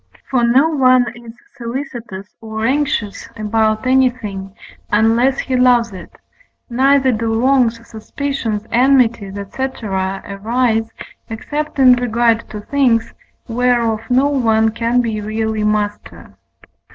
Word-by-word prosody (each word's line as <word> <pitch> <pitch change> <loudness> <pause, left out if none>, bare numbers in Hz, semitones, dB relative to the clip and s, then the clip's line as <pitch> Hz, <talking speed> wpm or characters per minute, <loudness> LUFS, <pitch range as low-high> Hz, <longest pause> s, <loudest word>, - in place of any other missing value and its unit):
For 250 -3 +2
no 255 +6 +4
one 255 -5 +3
is 235 -1 -12 0.2
solicitous 235 -5 -7
or 220 0 -4
anxious 265 -6 -1
about 215 +1 0
anything, 235 -7 0 0.4
unless 230 +5 +3
he 260 - -2
loves 245 -2 +3
it; 185 -3 -10 0.6
neither 265 +2 +3
do 225 0 -1
wrongs, 240 -3 +1
suspicions, 225 -2 -4
enmities, 235 -5 +2
&c. 200 +6 -5 0.2
arise, 210 +4 -1 0.4
except 295 +8 -4
in 260 -2 +7
regard 235 -1 +1
to 210 - -7
things 240 -2 +1 0.3
whereof 235 -2 +1
no 260 +3 +3
one 225 -6 +2
can 235 +2 0
be 220 -3 -3
really 220 0 -2
master. 210 -1 -3
230 Hz, 115 wpm, -17 LUFS, 215-255 Hz, 0.6 s, in